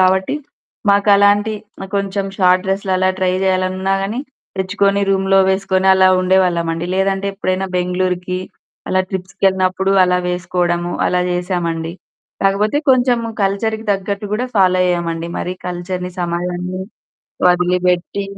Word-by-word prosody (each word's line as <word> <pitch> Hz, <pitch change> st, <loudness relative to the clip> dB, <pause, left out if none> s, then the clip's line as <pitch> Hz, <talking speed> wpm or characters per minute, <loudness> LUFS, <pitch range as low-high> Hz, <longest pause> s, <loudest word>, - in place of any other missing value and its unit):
గావట్టి, 190 Hz, +4 st, +2 dB, 0.6 s
మాకలాంటి 205 Hz, +1 st, +4 dB, 0.4 s
కొంచెం 200 Hz, 0 st, -1 dB
short 185 Hz, -1 st, +3 dB
డ్రెస్లలా 190 Hz, -1 st, 0 dB
try 185 Hz, -1 st, +1 dB
జేయాలనున్నా 185 Hz, 0 st, 0 dB
గాని, 215 Hz, +6 st, -2 dB, 0.4 s
తెచ్చుకొని, 200 Hz, +1 st, +1 dB
రూంలో 195 Hz, 0 st, +3 dB
వేసుకొని, 190 Hz, 0 st, 0 dB
అలా 190 Hz, 0 st, +5 dB
ఉండేవాళ్ళమండి. 175 Hz, -3 st, +1 dB
లేదంటే 195 Hz, +1 st, 0 dB
ఎప్పుడైనా 190 Hz, -1 st, -1 dB
బెంగుళూరుకి, 180 Hz, 0 st, -1 dB, 0.5 s
అలా 185 Hz, -, +3 dB
ట్రిప్స్‌కెళ్ళినప్పుడు 190 Hz, 0 st, 0 dB
అలా 180 Hz, 0 st, +2 dB
వేసుకోడము, 175 Hz, -1 st, -1 dB, 0.2 s
అలా 180 Hz, -, +1 dB
జేసామండి. 175 Hz, -2 st, -2 dB, 0.5 s
కాకపోతే 205 Hz, +6 st, +2 dB
కొంచెం 250 Hz, -1 st, +3 dB, 0.2 s
కల్చర్‌కి 220 Hz, +3 st, -1 dB
తగ్గట్టు 200 Hz, +1 st, -3 dB
కూడా 245 Hz, +4 st, -1 dB
ఫాలో 185 Hz, -2 st, +4 dB
అయ్యామండి, 170 Hz, -2 st, -1 dB
మరి 180 Hz, -, -3 dB
కల్చర్‌ని 180 Hz, 0 st, -4 dB
సమాజాన్ని 180 Hz, +1 st, -3 dB, 0.7 s
వదిలిపెట్టి 180 Hz, +2 st, +1 dB
185 Hz, 110 wpm, -17 LUFS, 180-195 Hz, 0.7 s, అలా